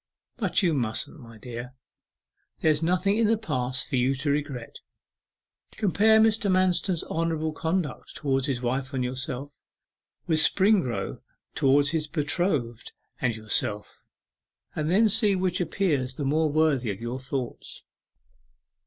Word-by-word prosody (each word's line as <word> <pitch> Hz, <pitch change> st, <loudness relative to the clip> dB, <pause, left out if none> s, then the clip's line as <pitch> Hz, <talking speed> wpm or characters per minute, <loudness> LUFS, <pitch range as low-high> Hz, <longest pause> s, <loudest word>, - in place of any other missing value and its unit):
'But -, -, +1 dB
you 170 Hz, -3 st, +3 dB
mustn't, 120 Hz, +3 st, -2 dB
my 115 Hz, -3 st, -13 dB
dear. 120 Hz, +3 st, -8 dB, 0.9 s
There's 155 Hz, -1 st, +2 dB
nothing 180 Hz, +4 st, +1 dB
in 225 Hz, -, +3 dB
the 225 Hz, +1 st, +3 dB
past 130 Hz, -, -2 dB
for 130 Hz, -, -1 dB
you 130 Hz, +2 st, +2 dB
to 140 Hz, +2 st, -1 dB
regret. 140 Hz, -5 st, -4 dB, 0.9 s
Compare 220 Hz, +2 st, +4 dB
Mr. 220 Hz, -1 st, +3 dB
Manston's 185 Hz, -1 st, +2 dB
honourable 160 Hz, -1 st, -1 dB
conduct 160 Hz, -1 st, -3 dB
towards 135 Hz, -2 st, 0 dB
his 130 Hz, -3 st, -2 dB
wife 130 Hz, +3 st, -2 dB
and 130 Hz, -, 0 dB
yourself, 130 Hz, +2 st, -5 dB, 0.6 s
with 160 Hz, -2 st, +1 dB
Springrove 155 Hz, -, +1 dB, 0.3 s
towards 140 Hz, +1 st, +3 dB
his 155 Hz, -2 st, -1 dB
betrothed 150 Hz, -, -1 dB, 0.3 s
and 120 Hz, -3 st, 0 dB
yourself, 110 Hz, -1 st, -2 dB, 0.7 s
and 155 Hz, 0 st, -1 dB
then 210 Hz, +6 st, +4 dB
see 210 Hz, -1 st, +4 dB
which 185 Hz, -1 st, 0 dB
appears 150 Hz, -7 st, 0 dB
the 145 Hz, -, -3 dB
more 155 Hz, +2 st, +1 dB
worthy 145 Hz, -6 st, +2 dB
of 100 Hz, -1 st, -4 dB
your 120 Hz, +3 st, -4 dB
thoughts. 130 Hz, -1 st, -5 dB
150 Hz, 135 wpm, -26 LUFS, 130-180 Hz, 0.9 s, Compare